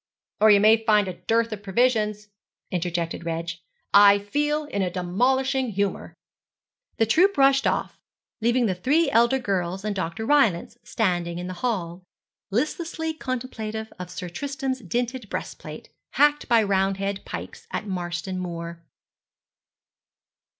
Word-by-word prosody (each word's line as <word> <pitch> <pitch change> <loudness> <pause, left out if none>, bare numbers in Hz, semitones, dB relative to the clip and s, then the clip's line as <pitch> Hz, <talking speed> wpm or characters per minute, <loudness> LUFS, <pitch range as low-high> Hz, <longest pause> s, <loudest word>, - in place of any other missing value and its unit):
'Or 215 - +6
you 205 -1 +7
may 220 +2 +5
find 210 -3 +3
a 185 - -3
dearth 230 +5 0
of 210 -2 -5
provisions,' 210 0 +1 0.4
interjected 170 -2 -2
Reg. 165 0 -3 0.4
'I 200 0 +8
feel 295 +9 -1
in 200 -9 -3
a 185 - 0
demolishing 255 +9 0
humour.' 200 +1 -2 0.8
The 225 - +3
troop 360 - +3
rushed 270 0 +4
off, - - -2 0.4
leaving 240 +2 +2
the 195 - +1
three 280 - +2
elder 235 +2 +4
girls 195 -5 -2
and 210 -1 -1
Dr. 185 +3 -3
Rylance 225 -9 +2
standing 175 -6 -1
in 175 - -5
the 185 - -5
hall, 185 -8 -2 0.5
listlessly 320 - -2
contemplative 225 -6 -5
of 180 -1 -6
Sir 180 - -6
Tristram's 270 - -3
dinted 240 +2 -3
breast - - -5
plate, - - -10 0.2
hacked 295 +1 +3
by 230 -2 +5
Roundhead 195 0 0
pikes 460 - -8
at 215 - -4
Marston 180 -1 -4
Moor. 170 -1 -6
210 Hz, 135 wpm, -24 LUFS, 185-255 Hz, 0.8 s, I